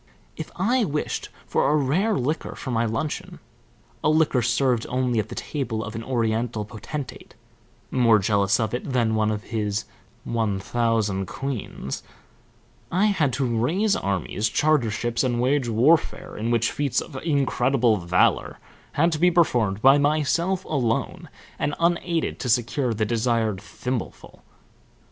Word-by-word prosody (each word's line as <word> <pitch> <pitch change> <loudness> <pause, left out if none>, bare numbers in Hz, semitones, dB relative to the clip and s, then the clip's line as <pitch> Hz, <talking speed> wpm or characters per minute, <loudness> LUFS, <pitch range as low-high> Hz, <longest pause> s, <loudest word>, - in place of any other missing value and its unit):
If 160 - -6
I 235 +7 +2
wished 150 -6 -2 0.2
for - - +1
a 150 - +3
rare 170 +10 +1
liqueur 150 +6 -2
for 130 - -5
my 115 0 +1
luncheon, 115 +7 -3 0.7
a - - +3
liqueur 155 -5 +3
served 120 0 +1
only 125 -2 0
at 105 0 -2
the 120 - -7
table 115 -7 -3
of 110 +1 -6
an 115 - -5
Oriental 115 -2 -1
potentate, 120 +7 -7 0.6
more 115 -3 +5
jealous 100 0 +2
of 110 -1 -1
it 125 +2 -3
than 115 -3 +2
of 110 0 0
his 105 -2 -2 0.4
one 110 -4 -1
thousand 110 -3 0
queens, 120 - -5 0.9
I 185 +4 +3
had 150 -8 +1
to 135 +2 0
raise 155 - +1
armies, 100 +3 -1
charter 150 -7 +2
ships, 120 +3 -1
and 120 -2 0
wage 130 0 +1
warfare 135 +9 +2
in 110 +2 -2
which 115 -1 +2
feats 145 -3 0
of 155 - -8
incredible 130 -5 +2
valor 90 0 +1 0.4
had 165 +4 +3
to 155 - -2
be 180 +2 +5
performed 120 - +2
by 135 +2 +7
myself 155 +6 +1
alone 120 -7 -1 0.3
and 145 - -1
unaided 170 -1 0
to 125 - -3
secure 120 +1 +1
the 110 0 0
desired 115 -3 0
thimbleful. 125 +4 -6
120 Hz, 145 wpm, -24 LUFS, 110-145 Hz, 0.9 s, by